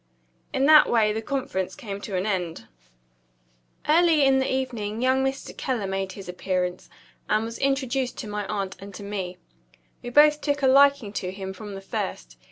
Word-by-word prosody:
In 270 -1 +1
that 305 +1 +7
way 215 -3 +3
the 220 - -3
conference 225 -7 -3
came 205 -8 -7
to 200 -3 -5
an 185 +1 0
end. 175 - -3 1.2
Early 320 -2 +5
in 265 0 +4
the 265 - 0
evening 235 -5 -2
young 260 +2 +2
Mr. 270 0 -3
Keller 245 -6 -2
made 195 0 -3
his 195 -2 -10
appearance, 180 0 -2 0.4
and 215 +1 +2
was 230 0 -7
introduced 270 -2 0
to 225 - -6
my 210 -1 -4
aunt 195 -2 -3
and 195 0 -10
to 205 - -8
me. 190 -3 -4 0.6
We 245 - -6
both 300 +3 +5
took 285 -1 -1
a - - +5
liking 275 -5 +5
to 180 - -3
him 190 0 -6
from 205 +1 -8
the 195 - -7
first. - - -5
215 Hz, 180 wpm, -25 LUFS, 195-265 Hz, 1.2 s, that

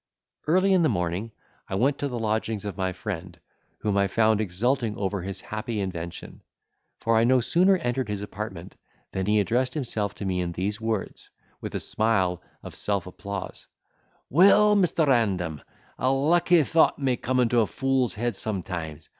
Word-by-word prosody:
Early 185 +4 +4
in 185 - +4
the 160 - +3
morning, 90 +2 -2 0.4
I - - -3
went 135 +8 +1
to 145 - -1
the 125 -3 -4
lodgings 110 -1 -2
of 100 -3 -4
my 95 0 -1
friend, 90 -2 -6 0.4
whom 105 -2 0
I 100 0 +3
found 110 +1 +2
exulting 110 +4 0
over 100 -1 -2
his 95 +2 -6
happy 110 +1 -4
invention! 85 -3 -6 0.6
for 115 0 +1
I 110 - +4
no 130 +2 +4
sooner 185 +10 +3
entered 125 -6 -2
his 105 -1 -3
apartment, 95 -4 -7 0.4
than 95 0 -2
he 105 0 +3
addressed 125 +5 0
himself 110 -8 -2
to 100 - -6
me 95 -1 -1
in 85 -1 -3
these 100 +5 -3
words, 110 -3 -3 0.3
with - - -6
a - - 0
smile 95 -6 0 0.2
of - - -8
self 100 -3 -1
applause: 100 +1 -7 0.6
"Well, 200 +6 +6
Mr. 175 -5 +3
Random, 95 - +1 0.4
a 130 - +2
lucky 165 +4 +4
thought 160 +3 +3
may 135 -3 +1
come 125 +2 -1
into 120 -1 +3
a 110 - +3
fool's 135 -3 0
head 120 0 -2
sometimes. 90 -7 -4
110 Hz, 170 wpm, -26 LUFS, 95-130 Hz, 0.6 s, Well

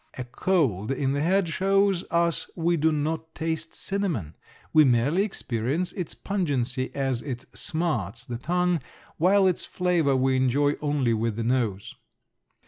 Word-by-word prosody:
A 130 - -3
cold 125 - 0
in 135 0 0
the 140 - 0
head 185 +3 +2
shows 195 +1 +2
us 170 0 +1
we 170 0 +1
do 160 0 +2
not 160 +2 -2
taste 160 0 -3
cinnamon, 175 - -2 0.4
we 155 -1 +7
merely 135 +7 +3
experience 150 - -1
its 180 -5 -5
pungency 135 -10 -1
as 135 -3 0
it 130 -4 -6
smarts 120 - -2
the 120 -3 -5
tongue 180 +3 +1 0.4
while 190 +4 +4
its 185 -2 +2
flavor 175 -6 +1
we 130 0 +2
enjoy 140 +3 +2
only 145 -5 +1
with 115 0 -1
the 115 - -2
nose. 115 -4 -1
145 Hz, 145 wpm, -26 LUFS, 125-175 Hz, 0.4 s, we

